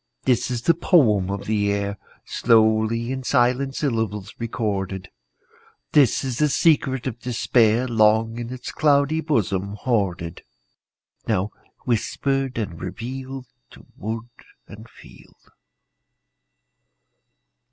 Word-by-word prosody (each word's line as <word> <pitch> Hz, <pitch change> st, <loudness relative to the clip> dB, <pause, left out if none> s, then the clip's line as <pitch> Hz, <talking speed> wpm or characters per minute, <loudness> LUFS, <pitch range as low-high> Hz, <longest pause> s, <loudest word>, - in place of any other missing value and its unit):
This 125 Hz, -1 st, +1 dB
is 120 Hz, -1 st, -3 dB
the 170 Hz, -, +5 dB
poem 120 Hz, -, +3 dB
of 100 Hz, 0 st, -4 dB
the 105 Hz, -1 st, +1 dB
air, 100 Hz, 0 st, -2 dB, 0.3 s
Slowly 110 Hz, +1 st, +2 dB
in 130 Hz, 0 st, -3 dB
silent 130 Hz, +1 st, +1 dB
syllables 110 Hz, -7 st, -2 dB
recorded; 100 Hz, -5 st, -3 dB, 0.8 s
This 145 Hz, -4 st, +4 dB
is 130 Hz, -3 st, -3 dB
the 150 Hz, 0 st, +3 dB
secret 135 Hz, -5 st, +2 dB
of 120 Hz, -3 st, -4 dB
despair, 120 Hz, -1 st, +2 dB
Long 115 Hz, 0 st, +3 dB
in 120 Hz, 0 st, -5 dB
its 130 Hz, -1 st, -6 dB
cloudy 145 Hz, +1 st, +2 dB
bosom 100 Hz, -, -1 dB
hoarded, 95 Hz, -8 st, -2 dB, 0.9 s
Now 95 Hz, +3 st, 0 dB, 0.3 s
whispered 135 Hz, +2 st, -1 dB
and 95 Hz, -7 st, -4 dB
revealed 130 Hz, +7 st, -6 dB, 0.3 s
To -, -, -15 dB
wood 115 Hz, +3 st, -5 dB, 0.4 s
and 110 Hz, +3 st, -12 dB
field. -, -, -18 dB
115 Hz, 110 wpm, -23 LUFS, 105-130 Hz, 0.9 s, the